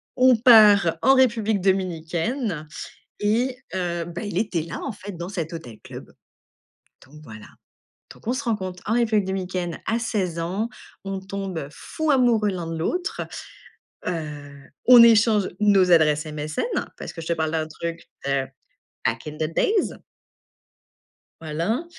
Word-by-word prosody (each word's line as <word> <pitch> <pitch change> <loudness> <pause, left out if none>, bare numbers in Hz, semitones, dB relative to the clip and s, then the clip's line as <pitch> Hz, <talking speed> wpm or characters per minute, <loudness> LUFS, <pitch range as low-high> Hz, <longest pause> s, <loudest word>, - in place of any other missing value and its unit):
on 255 -1 +6
part 210 -7 +6
en 270 - +5
République 225 -5 +2
Dominicaine 180 - -1 0.5
et 240 +5 +1 0.2
heu, 175 -2 -2
bah, 175 +1 -6
il 205 - -4
était 180 -7 -1
là, 160 - -6
en 275 - -3
fait, 205 0 -9
dans 175 +1 -5
cet 170 -4 -4
hôtel 120 -10 -8
club, - - -10 1.0
donc 150 +3 -15
voilà, 110 -7 -11 0.7
donc - - -21
on 240 - +1
se 285 - -4
rencontre 190 -6 -3
en 220 - 0
République 220 -4 +2
Dominicaine 185 -2 -3
à 225 - +1
16 195 -8 -2
ans, 190 +7 -2 0.4
on 195 -1 -4
tombe 190 -6 -5
fou 315 - -3
amoureux 235 -6 +3
l'un 175 -3 -4
de 165 - -4
l'autre, 360 - -2 0.8
heu, 150 -4 -5 0.3
on 245 -1 +10
échange 225 -3 +5
nos 195 -3 +4
adresses 150 -2 +4
MSN 150 0 -3 0.3
parce - - -7
que 165 - -8
je 160 - -7
te - - +1
parle 160 -1 -1
d'un 155 -1 -1
truc, 170 +1 -6 0.2
heu, 140 -1 0 0.6
back 115 +4 -1
in 150 - -5
the 160 +1 -2
days. 415 - +1 1.5
Voilà, 165 - -2
185 Hz, 150 wpm, -23 LUFS, 165-220 Hz, 1.5 s, on